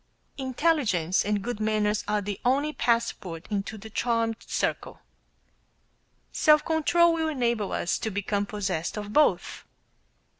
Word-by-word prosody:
Intelligence 260 - +1
and 205 -1 -1
good 240 -2 -4
manners 215 -1 +1
are 210 0 +1
the 200 -1 -5
only 280 +5 +1
passport 215 - -1
into 205 +1 -3
the 220 +1 -11
charmed 230 -1 0
circle. - - -2 1.3
Self 305 -1 +4
control 335 +1 +3
will 320 -1 0
enable 235 -8 -1
us 170 - -1
to 220 - -2
become 205 0 -2
possessed 190 -4 -3
of 210 0 -6
both. 300 0 +2
220 Hz, 125 wpm, -26 LUFS, 205-270 Hz, 1.3 s, Self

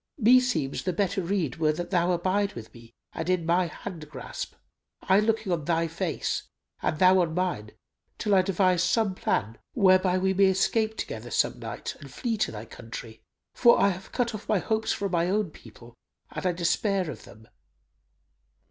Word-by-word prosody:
Meseems 240 - +3
the 185 - -2
better 195 +2 0
rede 170 -7 -1
were 155 -2 +2
that 175 +4 -5
thou 175 -1 +2
abide 190 +3 0
with 110 -1 -10
me 115 -1 -15 0.2
and 160 +2 -4
in 180 -3 +1
my 175 +2 +2
hand 160 -1 -8
grasp, - - -7 0.5
I 190 +1 +4
looking 220 -2 0
on 165 -4 -1
thy 165 0 +1
face, 165 +1 -3 0.3
and 155 - -1
thou 185 +2 +6
on 160 -2 -1
mine, 175 - -2 0.4
till 210 - 0
I 190 - +6
devise 185 -1 +2
some 195 +2 +2
plan, 110 - -2 0.2
whereby 185 -4 +4
we 190 +1 +1
may 195 +1 +4
escape 215 +4 +1
together - - -5
some - - 0
night - - -6
and - - -12
flee 235 -3 -2
to 210 - 0
thy 110 0 -7
country; 115 -1 -9 0.3
for 235 -1 +5
I - - +5
have 185 0 -6
cut 240 -2 -1
off 215 - -8
my 210 - +3
hopes 220 +4 -1
from 200 -2 -2
my 170 0 +1
own 205 -3 0
people 120 -2 -15 0.4
and 185 - -3
I - - +3
despair 180 +2 0
of 120 - -11
them." 110 +1 -16
185 Hz, 185 wpm, -27 LUFS, 160-200 Hz, 0.5 s, thou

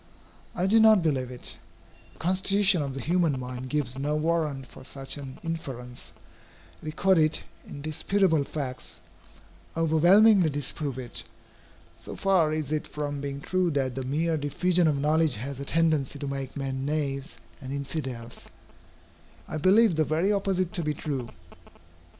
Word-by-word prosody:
I 180 - 0
do 215 +4 +5
not 220 -4 +6
believe 135 -6 0
it. 125 -1 -6 0.6
The - - -22
constitution 190 0 +2
of 140 -2 -4
the 135 - -4
human 165 -3 +1
mind 125 0 -6
gives 135 -3 -1
no 145 +2 0
warrant 155 -4 0
for - - -14
such 135 +1 -5
an 135 -3 -8
inference. 135 -7 -6 0.7
Recorded, 155 0 +2 0.3
indisputable 155 +3 +1
facts, 130 -3 -5 0.8
overwhelmingly 175 +4 +5
disprove 145 -1 -2
it. 125 -2 -5 0.7
So - - -8
far 185 -5 +3
is 155 -2 -2
it 155 -1 -1
from 145 -1 -4
being 140 0 -5
true 185 +3 +1
that 135 -4 0
the 135 - -4
mere 160 +5 0
diffusion 170 +4 +1
of 150 -2 +2
knowledge 155 0 +2
has 130 +5 -5
a 140 - -5
tendency 155 -3 +1
to 140 0 -5
make 135 -1 -5
men 135 -1 -3
knaves 140 0 -2 0.2
and 130 -1 -7
infidels, 135 -4 -5 1.0
I - - -4
believe 190 +3 +4
the 155 - +4
very 160 +6 +1
opposite 195 -3 0
to 175 - +1
be 150 -1 -1
true. 135 -5 -4
150 Hz, 145 wpm, -27 LUFS, 135-170 Hz, 1.0 s, not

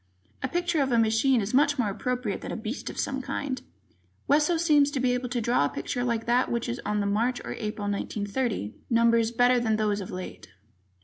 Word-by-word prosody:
A 260 - 0
picture 345 +1 0
of 270 -1 0
a 235 - +3
machine 225 +3 +3
is 200 +4 -4
much 290 +2 +4
more 220 -5 +1
appropriate 250 0 -2
than - - -6
a - - -3
beast 225 +4 -5
of - - -9
some 270 0 -1
kind. 275 -1 -3 0.7
Wesso 300 +4 +3
seems 300 -4 +4
to 285 -2 -3
be 250 -1 +2
able 250 0 -2
draw 240 - +1
a - - 0
picture 245 - -3
like 235 -2 -1
that 245 +2 +2
which 235 0 -1
is 240 0 -3
on 210 0 0
the - - -1
March 230 +5 +1
or - - -4
April, 210 -1 -4
1930, 205 - -2 0.2
numbers 230 -1 +3
better 245 +1 +3
than 220 -2 +1
those 210 -1 0
of 190 - -7
late. 185 0 -7
240 Hz, 210 wpm, -27 LUFS, 215-265 Hz, 0.7 s, much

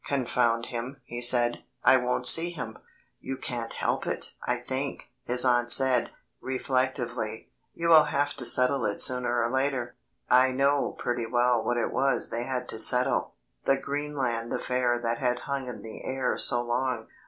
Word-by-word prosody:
"Confound 120 -3 0
him," 125 +3 -6
he 120 0 -7
said, 120 -1 +3 0.2
"I 130 - +6
won't 125 0 -2
see 165 +6 +6
him." 125 -10 -7 0.4
"You 135 0 -6
can't 120 -3 -5
help - - -2
it, - - -1
I 125 - 0
think," 130 +3 -4 0.2
his 125 +1 +2
aunt 120 -1 +2
said, 130 -2 +4 0.3
reflectively; 130 -4 -2 0.2
"you 170 0 -1
will 160 -2 +8
have 145 0 -1
to 125 - -2
settle 125 +3 +3
it 100 - -2
sooner 120 -2 +2
or 115 - -1
later." 130 -2 -1 0.3
I 130 +1 +4
know 140 +2 +1
pretty 120 -1 -3
well 120 -1 +2
what 120 +2 -1
it 120 - -1
was 135 0 0
they 120 +1 -2
had 125 -1 -3
to 110 - -2
settle 125 +2 +2 0.3
the 135 - +3
Greenland 135 -5 -3
affair 125 -1 0
that 115 -1 -2
had 125 -2 -1
hung 140 -2 -3
in 125 - -7
the 110 - -9
air 130 -1 -2
so 120 0 +2
long. 120 -1 -2
125 Hz, 170 wpm, -27 LUFS, 120-130 Hz, 0.4 s, will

